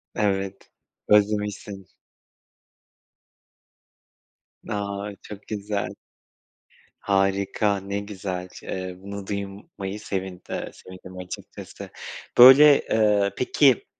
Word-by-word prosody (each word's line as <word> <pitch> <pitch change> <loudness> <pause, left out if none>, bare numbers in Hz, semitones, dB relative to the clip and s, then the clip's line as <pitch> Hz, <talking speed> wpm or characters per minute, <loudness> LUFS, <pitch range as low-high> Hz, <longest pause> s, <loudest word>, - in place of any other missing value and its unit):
Evet, 95 -2 -2 0.4
özlemişsin. 105 -2 +1 2.8
A, 100 0 -3
çok 105 -1 -11
güzel. 105 -1 -3 1.1
Harika. 100 +1 +1
Ne 100 +1 -4
güzel, 95 -3 -5 0.2
eee, 95 -1 -5
bunu 100 0 -8
duymayı 100 0 -6
sevind 95 -3 -4
eee, - - -4
sevindim 95 0 -12
açıkçası. 90 0 -9 0.5
Böyle, 135 +4 +9
ııı, 105 -2 +3
peki 130 -1 +3
100 Hz, 75 wpm, -24 LUFS, 95-105 Hz, 2.8 s, Böyle